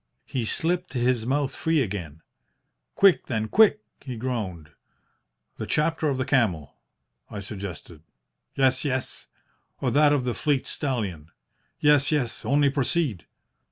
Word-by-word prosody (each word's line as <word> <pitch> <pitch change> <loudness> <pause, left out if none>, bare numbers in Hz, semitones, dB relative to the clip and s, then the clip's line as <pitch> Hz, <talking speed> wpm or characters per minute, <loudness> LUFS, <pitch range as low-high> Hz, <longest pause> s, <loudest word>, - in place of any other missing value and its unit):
He 125 -4 -3
slipped 175 +9 -1
his 120 -2 +1
mouth 140 +1 0
free 160 -1 +1
again. 90 - -4 0.7
"'Quick, 195 -3 +4
then, 110 -3 -1
quick!' 215 - +5 0.2
he 130 -3 -6
groaned. 105 -11 -4 0.9
"'The - - -5
Chapter 160 0 +1
of 135 - -1
the 130 - -1
Camel?' 95 - +1 0.6
I 105 - -6
suggested. 95 -5 -8 0.5
"'Yes, 130 -1 +2
yes.' 130 -3 -3 0.5
"'Or - - 0
that 150 0 +5
of 145 -3 +2
the 125 -1 -1
Fleet 145 -1 0
Stallion?' 100 - -3 0.5
"'Yes, 145 -1 +4
yes. 130 -7 -1
Only 140 0 +3
proceed!' 140 - -1
130 Hz, 130 wpm, -25 LUFS, 105-145 Hz, 0.9 s, quick